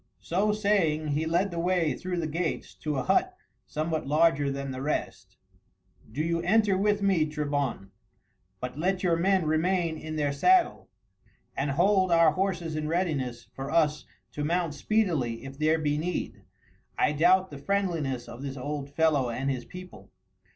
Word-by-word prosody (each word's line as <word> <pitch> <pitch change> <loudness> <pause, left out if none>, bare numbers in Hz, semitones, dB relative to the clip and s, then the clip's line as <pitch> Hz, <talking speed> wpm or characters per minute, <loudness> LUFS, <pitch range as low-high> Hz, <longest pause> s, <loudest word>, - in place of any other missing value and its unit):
So 195 +5 0
saying 190 -8 +1
he 150 +2 0
led 175 +4 +1
the 170 - -4
way 175 -3 +1
through 180 -1 -4
the 170 - -1
gates 160 +1 -3
to 150 -2 -4
a 130 - -1
hut - - +1 0.3
somewhat 155 -1 -2
larger 150 -1 +3
than 140 0 -4
the 130 0 -6
rest. 150 +2 -3 0.7
"Do 150 +7 -2
you 170 0 0
enter 205 +2 +3
with 205 +1 +1
me, 185 -6 +3
Trebon, 145 -9 -2 0.7
but 125 +3 -6
let 185 +3 0
your 175 -2 +3
men 185 +1 +2
remain 165 +1 0
in 155 0 -6
their 145 -2 0
saddle, 365 - +3 0.7
and 140 +1 -1
hold 185 +5 +3
our 165 -2 +6
horses 175 -2 -2
in 155 0 -2
readiness 150 -8 -1
for 135 +1 -6
us 155 -2 +1 0.3
to 150 - -4
mount 170 0 0
speedily 150 - 0
if 135 +1 -9
there 155 +1 +3
be 150 -1 0
need. 175 +3 -4 0.5
I - - +3
doubt 180 +5 +3
the 145 - -8
friendliness 165 -8 -1
of 120 - -9
this 140 -1 -5
old 145 +1 -4
fellow 145 -4 +2
and 135 +4 -2
his 125 -2 -4
people." 180 0 -11
160 Hz, 165 wpm, -28 LUFS, 145-180 Hz, 0.7 s, our